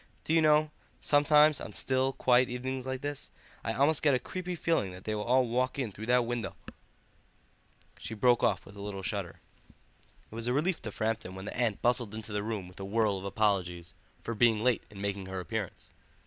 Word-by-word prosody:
Do 160 - -1
you 165 - +5
know, 155 0 +4 0.3
sometimes 150 +1 +5
on - - -7
still, 130 0 +1
quiet 125 0 +3
evenings 130 +1 -4
like 130 0 -3
this, 145 -1 -4 0.3
I 115 - -1
almost 140 +5 +2
get 145 -3 +4
a - - +1
creepy 180 +3 -5
feeling 165 - 0
that 90 +1 -11
they 110 - -2
will 105 0 -3
all 125 +1 +3
walk 125 +3 0
in 125 -6 -2
through 110 +3 -8
that 125 0 +4
window—" 115 -5 -3 1.4
She 110 - -6
broke 120 +3 +4
off 100 -5 +1
with 100 - -13
a 100 - -9
little 100 -1 -5
shudder. 100 -5 -4 0.9
It - - -12
was 115 +1 -4
a 125 - +2
relief 165 +6 0
to 110 - -5
Framton 110 -3 -2
when 95 +1 -7
the - - -6
aunt 120 -4 0
bustled 120 -3 +1
into 110 -1 -7
the 105 - 0
room 105 -3 -4
with 90 +1 -15
a - - -5
whirl 105 0 +1
of 95 - -8
apologies 95 -5 0 0.3
for 115 - -3
being 110 -1 +3
late 125 -2 +3
in 100 -2 -10
making 100 -1 -3
her 95 0 -4
appearance. 90 - -5
115 Hz, 210 wpm, -30 LUFS, 100-130 Hz, 1.4 s, you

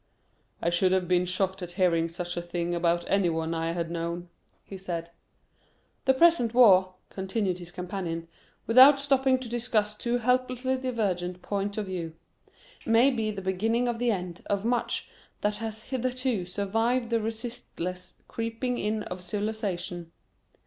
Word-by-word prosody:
"I 170 - +2
should 180 +2 +3
have 185 -1 +1
been 180 0 +3
shocked 190 +1 -1
at 175 -1 -6
hearing 170 -3 +2
such 175 +1 -4
a 175 - -2
thing 175 0 -3
about 170 0 +1
any 195 -3 +3
one 165 0 -1
I 165 0 -1
had 170 -1 -3
known," 170 +1 -4 0.4
he 195 - -9
said. 170 -3 -5 0.9
"The 265 0 +4
present 260 -7 +4
war," 190 -6 +6 0.2
continued 190 -1 -2
his 175 -1 -9
companion, 175 -2 -4 0.4
without 260 +4 +8
stopping 270 -2 +3
to 255 -1 -6
discuss 230 -3 0
two 235 +3 -1
hopelessly 255 +1 +1
divergent 190 -8 -2
points 200 0 -2
of 215 - -1
view, 170 -4 -5 0.7
"may 230 +4 +5
be 225 -4 -1
the 200 -2 -5
beginning 225 +6 +1
of 235 -1 -1
the 245 0 +1
end 180 -4 -3
of 200 +1 -1
much 240 0 0 0.3
that 210 0 0
has 220 0 -4
hitherto 255 -5 -1
survived 225 +6 0
the 230 -1 +2
resistless 220 -5 -5
creeping 230 +2 -3
in 215 0 -1
of 180 -1 -6
civilisation. 185 -4 -3
200 Hz, 155 wpm, -28 LUFS, 175-235 Hz, 0.9 s, without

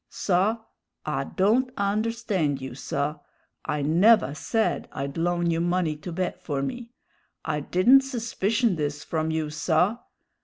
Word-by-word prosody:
"Saw, 195 +4 +1 0.5
I 140 -3 -1
don't 230 - +1
understand 200 - 0
you, 130 -2 -7
saw. 145 +3 -3 0.4
I 150 -1 -2
never 175 +3 +4
said 220 +8 -1
I'd 140 0 -4
loan 175 0 0
you 165 0 0
money 175 -2 0
to 165 +4 -7
bet 180 +1 -3
for 140 -3 -2
me. 235 - -5 0.6
I 155 -2 -1
didn't 205 - +5
suspicion 235 - 0
this 145 -1 -3
from 160 -1 -2
you, 160 -1 -2
saw. 170 +8 +1
175 Hz, 140 wpm, -25 LUFS, 150-220 Hz, 0.6 s, didn't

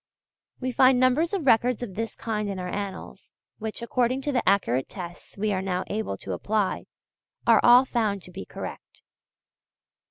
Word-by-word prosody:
We 255 0 -2
find 255 +1 +5
numbers 255 +7 +3
of 385 -7 -2
records 245 0 +3
of 210 -6 -6
this 225 +3 -4
kind 215 -2 -3
in 195 - -4
our 180 -1 -4
Annals, 200 -1 -6 0.3
which, 220 +1 -5
according 250 +2 0
to 290 - -1
the 250 -3 +1
accurate 135 -10 +1
tests 175 -1 -9
we 210 +1 0
are 185 - -1
now 185 -1 -1
able 210 - -3
to 95 - -3
apply, 205 - -1 0.6
are 230 -3 +6
all 245 +2 +7
found 215 -7 -1
to 180 - -5
be 190 - -7
correct. - - -9
220 Hz, 170 wpm, -26 LUFS, 190-250 Hz, 0.6 s, all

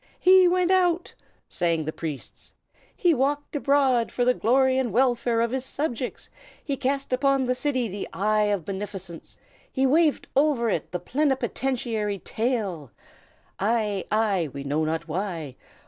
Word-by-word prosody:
"He 370 0 +6
went 360 0 +2
out!" 360 -2 +2 0.3
sang 165 -3 0
the 155 - -3
priests. 155 -5 -7 0.4
"He 350 -3 +3
walked 285 +2 -1
abroad, 275 -4 +2
for 245 - 0
the 250 - +4
glory 260 +2 +2
and 250 -4 -1
welfare 240 -2 +2
of 235 0 0
his 260 0 -2
subjects. 260 -3 -4 0.3
He 280 - -1
cast 270 0 -2
upon 275 0 +2
the 250 - +1
city 255 -2 0
the 200 0 -6
eye 215 +1 +1
of 200 -5 -1
beneficence; 190 -3 -6 0.3
he 265 - +1
waved 305 +3 +2
over 270 -5 +2
it 165 - -3
the 180 - -2
plenipotentiary 250 - -1
tail! 205 - -2 0.7
"Ai! 210 -2 0
ai! 205 -7 +1
we 140 +1 -7
know 145 +3 0
not 160 +2 -2
why! 165 -5 -4
240 Hz, 145 wpm, -25 LUFS, 195-270 Hz, 0.7 s, He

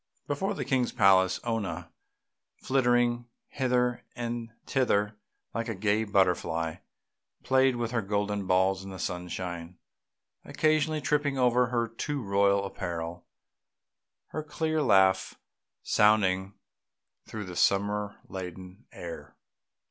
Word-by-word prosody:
Before 195 +8 -1
the - - -3
King's 130 -3 +1
palace 95 -4 +4
Oona, 115 -4 -3 0.6
flitting 120 -2 +1 0.2
hither 125 -2 0
and 120 -1 -4 0.2
thither, 105 -6 +1 0.4
like 115 0 -3
a 110 - -2
gay 105 +3 +1
butterfly, 90 -5 +1 0.7
played 130 -1 +3
with 120 -1 -2
her 120 -2 0
golden 100 0 -1
balls 95 +1 +2
in 95 - -8
the 95 - -7
sunshine, 90 -1 -5 0.7
occasionally 155 0 +1
tripping 145 0 +1
over 125 -1 +3
her 120 -2 0
too 140 +6 -4
royal 100 0 +2
apparel, 85 -2 -5 1.0
her 155 - -3
clear 155 +1 -1
laugh 95 -6 +4 0.5
sounding 95 -2 +3 0.7
through 105 -2 -6
the 90 -1 -8
summer 100 +2 +1
laden 95 +3 -8
air. 80 -4 -8
105 Hz, 110 wpm, -28 LUFS, 95-125 Hz, 1.0 s, palace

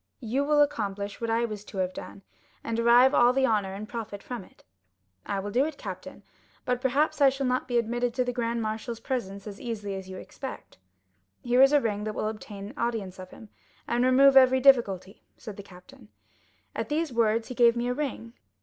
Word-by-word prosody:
You 255 +3 -1
will 295 0 +4
accomplish 205 -8 -4
what 230 - -2
I 230 +1 +1
was 210 -3 -6
to 200 - -10
have 185 -1 -1
done, 100 +1 -9 0.4
and 230 - -3
derive 240 +3 +5
all 245 +1 +5
the 265 0 +2
honor 205 -5 0
and 210 +2 -7
profit 220 -4 -7
from 245 -5 -6
it.' - - -22 0.6
"'I 200 - -1
will 205 +1 -5
do 250 +5 +3
it, 305 -1 -4
captain; - - -8 0.4
but 250 0 -1
perhaps 280 +4 +1
I 275 - +8
shall 270 +1 -3
not 255 0 0
be 245 -1 0
admitted 240 +1 0
to 255 - +2
the 245 - -2
grand 235 -1 -2
marshal's 220 +2 -4
presence 200 -7 -4
as 205 -1 -9
easily 210 -4 -4
as 190 -1 -7
you 185 - -7
expect?' - - -9 0.6
"'Here 245 +1 +3
is 270 +1 +7
a 295 - +5
ring 210 -5 -2
that 215 0 -4
will 215 - -1
obtain 210 0 -8
audience 215 -8 -3
of 185 0 -9
him, 220 - -14 0.4
and 240 +1 +1
remove 270 +2 +5
every 260 0 +6
difficulty,' 215 -8 +3 0.2
said 215 -4 -9
the 200 - -8
captain. 200 +5 -16 0.7
At - - -3
these 305 -2 -1
words 225 -1 +1
he - - -4
gave 235 -1 +4
me 240 +1 -1
a 250 - 0
ring. 250 -5 -4
235 Hz, 210 wpm, -27 LUFS, 205-255 Hz, 0.7 s, I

